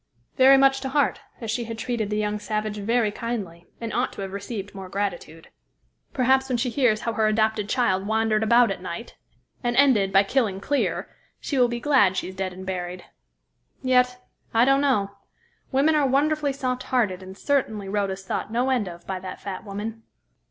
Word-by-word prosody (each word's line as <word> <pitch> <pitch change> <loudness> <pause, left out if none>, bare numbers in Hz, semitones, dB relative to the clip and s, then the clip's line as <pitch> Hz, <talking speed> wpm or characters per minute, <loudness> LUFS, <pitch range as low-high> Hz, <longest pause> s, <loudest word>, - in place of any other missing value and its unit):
"Very 270 0 +7
much 270 0 +4
to 265 - -3
heart, 285 0 +1 0.2
as 225 -2 -3
she 235 +1 -2
had 225 0 -6
treated 225 -2 -2
the 210 - -1
young 210 0 -1
savage 215 0 -3
very 225 +1 +1
kindly, 205 -7 -5
and 230 -1 -5
ought 245 +1 0
to - - -7
have 195 -1 -5
received 200 0 -6
more 190 -2 -8
gratitude. 180 -5 -4 0.6
Perhaps 265 +1 +2
when 250 - +1
she 245 +1 -1
hears 235 -5 +2
how 230 - -2
her 220 -1 +2
adopted 215 -1 +1
child 195 -6 +1
wandered 220 0 +1
about 235 +1 +4
at 185 - -5
night, 185 +5 -6 0.5
and 240 0 0
ended 240 -9 +4
by 195 +1 +5
killing 210 -3 0
Clear, 285 +8 -1 0.3
she 275 - -2
will 245 - +5
be 240 0 -3
glad 240 -9 +3
she - - -2
is 185 - -10
dead 190 -1 -3
and 185 +1 -9
buried. 180 -1 -5 0.8
Yet, 250 -1 +3 0.4
I 230 +2 +6
don't 275 +1 +4
know. 210 -9 +1 0.6
Women 280 +4 +3
are 295 -3 +3
wonderfully 290 +2 +1
soft 255 -2 -2
hearted, 215 -9 0
and 190 +1 -10
certainly 220 -8 0
Rhoda 200 -1 -1
is 190 0 -9
thought 205 - -3
no 245 +3 +1
end 240 -6 +1
of 175 -1 -9
by 190 -1 -4
that 185 0 -8
fat 195 -2 -6
woman." 215 +2 -6
220 Hz, 195 wpm, -24 LUFS, 195-255 Hz, 0.8 s, Very